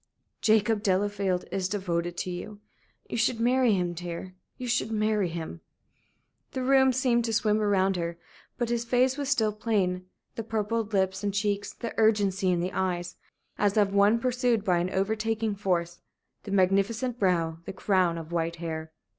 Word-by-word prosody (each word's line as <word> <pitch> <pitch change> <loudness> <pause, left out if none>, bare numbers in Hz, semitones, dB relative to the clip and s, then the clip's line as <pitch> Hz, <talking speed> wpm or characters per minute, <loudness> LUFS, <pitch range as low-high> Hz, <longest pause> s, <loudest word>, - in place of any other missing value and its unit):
"Jacob 220 0 +3
Delafield 195 -2 0
is 190 -1 -1
devoted 175 -3 -2
to 180 - -3
you. 205 +4 -7 0.5
You - - -4
should 230 +1 +1
marry 245 0 +3
him, 175 -2 -1
dear 175 +1 -6 0.2
you 250 - -5
should 235 -2 0
marry 215 -3 +1
him." 160 - -6 0.9
The 260 - -2
room 265 0 +5
seemed 245 -2 +2
to 225 - -1
swim 210 0 +2
around 195 -2 +2
her. 170 0 -3 0.4
But 240 -1 -1
his 235 -1 0
face 250 +2 +2
was 285 -1 -3
still 220 -6 +2
plain 190 -4 -1 0.3
the 225 - -5
purpled 220 0 -2
lips 190 -1 0
and 200 -1 -1
cheeks, 205 -1 -1
the 230 - -6
urgency 200 -3 +3
in 175 -1 +1
the 180 +2 -3
eyes, 180 -2 -2 0.4
as 205 0 +2
of 200 -2 +3
one 200 +3 +5
pursued 245 -2 +1
by 180 -2 +2
an 175 +1 -1
overtaking 220 +3 -1
force, 175 -3 -1 0.4
the 200 - -6
magnificent 200 +6 +1
brow, 165 -4 +1
the - - -6
crown 185 -4 +1
of 165 0 -8
white 170 0 -1
hair. 160 -1 -5
205 Hz, 170 wpm, -27 LUFS, 180-225 Hz, 0.9 s, room